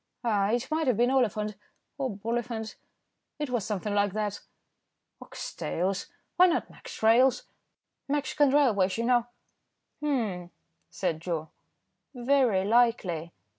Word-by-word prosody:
"Ah! 205 -4 +2
it 240 +5 -1
might 315 -1 0
have 245 -5 +2
been 240 +2 +3
Oliphant, 215 -5 +1 0.5
or 265 -1 0
Boliphant, 225 0 -3 0.6
it 295 -3 -4
was 240 -4 0
something 210 0 -3
like 205 -1 +1
that." 210 -1 -2 0.8
"Ox - - -7
tails. 190 +3 -2 0.3
Why 365 0 +8
not 345 - -1
Mex. - - -11
Rails.? 245 +3 +5 0.6
Mexican 290 0 +2
Railways, 225 -10 +3
you 230 - -1
know." 240 -1 +3 0.7
"Humph," 220 -12 -1 0.4
said 165 -4 -2
Joe, 165 -2 -4 0.6
"very 245 -6 +2
likely." 205 -8 +2
230 Hz, 125 wpm, -28 LUFS, 200-260 Hz, 0.8 s, Why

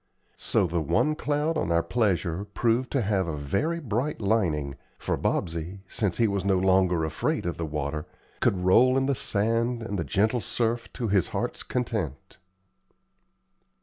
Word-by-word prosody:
So - - +1
the 85 -1 -1
one 120 - +2
cloud 150 +2 0
on 85 - -1
our 85 0 +3
pleasure 95 -3 0
proved 115 +4 0
to 135 -4 +2
have 95 -3 +1
a 80 -2 -3
very 120 - -1
bright 130 +1 -2
lining, 85 -10 +1 0.2
for - - -1
Bobsey, 85 +4 -2
since 95 -1 -1
he 115 - +4
was 100 -2 -1
no 95 -1 +2
longer 90 -3 +3
afraid 80 - -1
of 85 - -2
the 80 - -3
water, 75 0 -3 0.3
could 90 -2 +1
roll 125 +8 +5
in 135 - +2
the 140 - +2
sand 115 +2 0
and 100 -3 -3
the - - 0
gentle 105 - +1
surf 115 +1 -1
to 120 -4 -2
his 95 -3 +3
heart's - - -3
content. 110 - -3
100 Hz, 165 wpm, -27 LUFS, 85-120 Hz, 0.3 s, roll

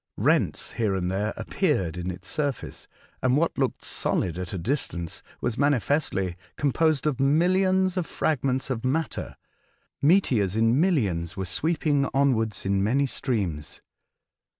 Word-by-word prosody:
Rents - - +1
here 105 -4 0
and 90 -1 -1
there 105 +3 -1
appeared 85 -3 0
in 90 +1 -4
its 90 0 -7
surface, 145 -4 -3 0.3
and 130 +2 +3
what 165 +2 +1
looked 135 -2 -1
solid 90 -1 -1
at 90 -1 -5
a 95 - -3
distance 85 - -3 0.2
was 120 -1 -2
manifestly 140 - +1 0.2
composed 150 +1 +2
of 150 -4 0
millions 185 +6 +3
of 180 - -1
fragments 135 -3 -1
of 115 -3 -3
matter, 145 +4 -2 0.7
meteors 130 - +3
in 115 +5 +3
millions 100 - 0
were 95 - -2
sweeping 145 - 0
onwards 115 -8 +1
in 95 0 +1
many 135 +7 +2
streams. 100 - -3
130 Hz, 135 wpm, -26 LUFS, 95-145 Hz, 0.7 s, and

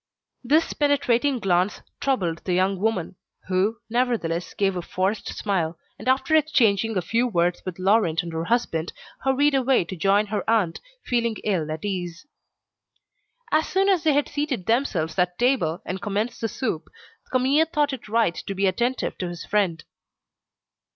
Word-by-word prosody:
This 305 +7 +2
penetrating 285 -2 +2
glance 185 -2 0 0.2
troubled 185 -12 0
the 180 - 0
young 190 +1 +1
woman, 195 -4 -1 0.3
who, 195 +5 +1
nevertheless, 225 -8 -1
gave 195 -2 +1
a 180 - -2
forced 190 +4 -2
smile, 175 -5 -1 0.2
and - - -8
after 265 +4 +3
exchanging 225 -9 +3
a 180 - 0
few 230 +7 +1
words 175 -5 +1
with 180 - -4
Laurent 185 -3 +2
and 170 -1 -7
her 165 +1 -2
husband, 175 -7 0 0.3
hurried 280 +2 +3
away 265 -7 +3
to 185 - -6
join 195 +4 +3
her 205 -3 0
aunt, 210 -8 +2 0.3
feeling 235 -2 0
ill 170 -7 0
at 155 +4 -5
ease. 180 - -4 1.3
As 310 +1 +2
soon 390 +1 +2
as 375 -4 +3
they 310 -2 +4
had 290 +1 +2
seated 290 -10 -2
themselves 200 - 0
at 180 0 +1
table, 240 -11 +1
and 185 +1 -4
commenced 210 +4 -2
the 225 - +1
soup, 210 - -3 0.4
Camille 270 +5 +3
thought 295 -3 +1
it 240 -4 -8
right 225 -5 +2
to 195 - -6
be 195 +1 +1
attentive 235 +7 0
to 180 - -2
his 175 -1 -7
friend. 190 -6 0
210 Hz, 165 wpm, -24 LUFS, 180-255 Hz, 1.3 s, they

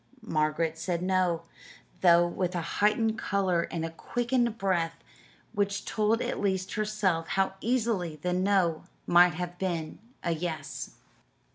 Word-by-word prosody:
Margaret 155 +1 0
said 175 0 -2
no, 185 -3 +1 0.6
though 175 -1 +6
with 180 +1 -2
a 175 - 0 0.2
heightened 220 +1 +3
color 185 -3 +1
and 165 -1 -3
a 165 - -5
quickened 240 +5 -1
breath 175 -5 0 0.6
which 200 0 -1
told 220 +2 +1
at - - -2
least 190 -2 -1
herself 210 -6 0
how 195 +1 +1
easily 220 -9 0
the 180 +4 -2
"no" 185 -3 +2 0.2
might 175 0 +6
have 175 +1 -5
been 170 -4 -3 0.2
a 170 - 0
"yes." 155 -4 -4
180 Hz, 135 wpm, -29 LUFS, 170-205 Hz, 0.6 s, though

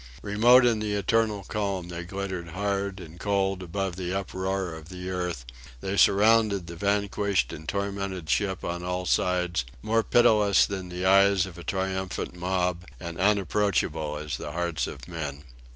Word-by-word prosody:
Remote 120 +5 +6
in 115 -3 +3
the 105 -1 -1
eternal 105 0 +1
calm 100 -3 -3
they 85 0 -5
glittered 95 -1 -5
hard 100 +2 -2
and 85 -1 -11
cold 95 -2 0
above 95 +1 -3
the 90 -1 -3
uproar 95 -1 -2
of 80 0 -10
the 90 0 -6
earth; 90 -8 -3 0.3
they 95 +9 -3
surrounded 105 -1 +4
the 85 +1 -8
vanquished 100 -4 0
and 80 0 -7
tormented 100 -3 -3
ship 95 +3 0
on 85 0 -3
all 90 0 -2
sides: 90 +2 +1 0.2
more 115 +1 +2
pitiless 105 -4 +4
than 95 -2 -5
the 90 +1 -4
eyes 100 0 +5
of 90 -2 -10
a - - -8
triumphant 95 -1 -3
mob, 90 0 -1 0.2
and 85 -2 -7
as 95 - +2
unapproachable 90 -7 0
as 75 -4 -4
the 75 - -6
hearts 85 -1 -1
of - - -9
men. 75 -5 -5
95 Hz, 165 wpm, -27 LUFS, 85-100 Hz, 0.3 s, Remote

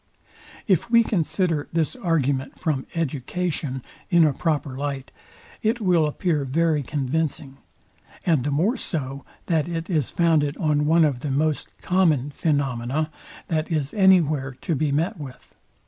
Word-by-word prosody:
If 195 +3 +2
we 230 0 +6
consider 165 -5 0
this 165 - 0
argument 145 - -1
from 145 -5 -1
EDUCATION 150 -2 -2 0.3
in 170 -3 +5
a 150 - +2
proper 150 -3 -1
light, 140 -1 -4 0.5
it 225 +3 +1
will 175 -7 +3
appear 150 0 0
very 155 +3 +1
convincing; 140 0 -2 0.7
and 160 -8 +3
the 145 - -1
more 180 - +1
so, 140 -4 -4 0.2
that 160 -1 0
it 165 +2 -4
is 155 -7 +1
founded 160 -4 +2
on 150 -3 +1
one 165 +1 +5
of 140 -5 0
the 145 - -4
most 150 +2 0 0.2
common 160 -7 +2
phaenomena, 140 0 -1 0.4
that 160 0 -1
is 150 -3 -1
any 190 -3 +6
where 140 -4 -2
to 170 - -1
be 150 0 0
met 165 +7 0
with. 135 -4 -10
155 Hz, 145 wpm, -24 LUFS, 140-170 Hz, 0.7 s, we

